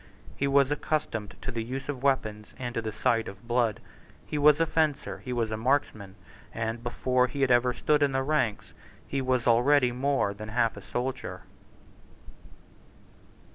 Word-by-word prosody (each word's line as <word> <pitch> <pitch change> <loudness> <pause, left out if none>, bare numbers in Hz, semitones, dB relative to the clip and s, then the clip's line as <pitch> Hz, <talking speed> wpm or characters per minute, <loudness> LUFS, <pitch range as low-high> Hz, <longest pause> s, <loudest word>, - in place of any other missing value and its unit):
He 140 - 0
was 140 0 +3
accustomed 115 -10 -2
to 130 - -3
the 115 -2 -3
use 130 +4 -5
of 140 -3 -4
weapons 110 -6 -1
and 120 -1 -4
to 115 - -1
the 110 -1 -4
sight 115 +1 +1
of 95 +4 -10
blood: 120 -3 +1 0.5
he - - -6
was 150 0 +5
a 165 - +4
fencer; 155 -3 0
he 125 - -7
was 115 -3 -1
a 110 - -2
marksman; 110 -6 -1 0.4
and, 115 +1 -3
before 125 +1 +1
he 140 +3 -5
had 135 -2 +3
ever 120 +1 +4
stood 150 +4 +1
in 145 -1 +3
the 135 0 0
ranks, 135 -7 -1 0.3
he 140 - -2
was 130 -2 0
already 125 +2 +4
more 130 -4 0
than 110 +1 -8
half 115 0 +1
a - - -9
soldier. 125 +2 -4
125 Hz, 175 wpm, -28 LUFS, 115-140 Hz, 0.5 s, was